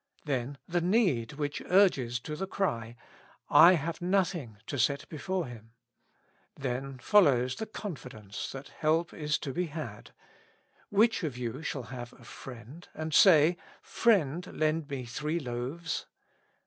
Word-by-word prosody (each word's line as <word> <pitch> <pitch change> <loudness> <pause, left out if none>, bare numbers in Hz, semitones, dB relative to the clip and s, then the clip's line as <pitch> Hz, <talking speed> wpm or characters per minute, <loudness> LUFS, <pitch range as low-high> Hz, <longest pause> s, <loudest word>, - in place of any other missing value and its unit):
Then 135 -1 -2
the 175 0 0
need 175 - +2
which 145 0 -3
urges 140 -11 +3
to 150 - -5
the 190 +5 -4
cry: 115 - -2 0.3
'' - - -31 0.2
I 180 - +8
have 170 +2 -2
nothing 175 - 0
to 140 - -4
set 140 +4 +1
before 180 +3 -2
him." 115 -3 -11 0.8
Then 135 0 -4
follows 130 - +4
the 220 - -4
confidence 125 - -7
that 135 +1 -8
help 160 +2 0
is 150 -1 -1
to 135 - -5
be 180 +3 -1
had: 145 -9 -7 0.8
"which 215 0 +3
of 145 -6 -3
you 125 +3 -4
shall 140 -5 -3
have 120 -1 -6
Sl. - - -19
friend 125 +6 -11
^ - - -11
and 155 0 -3
say, 170 -1 +6 0.3
Frietid, 180 - +1
lend 155 -1 +1
me 135 -3 -4
three 150 +8 -2
loaves." 135 +5 -4
150 Hz, 150 wpm, -30 LUFS, 125-175 Hz, 0.8 s, I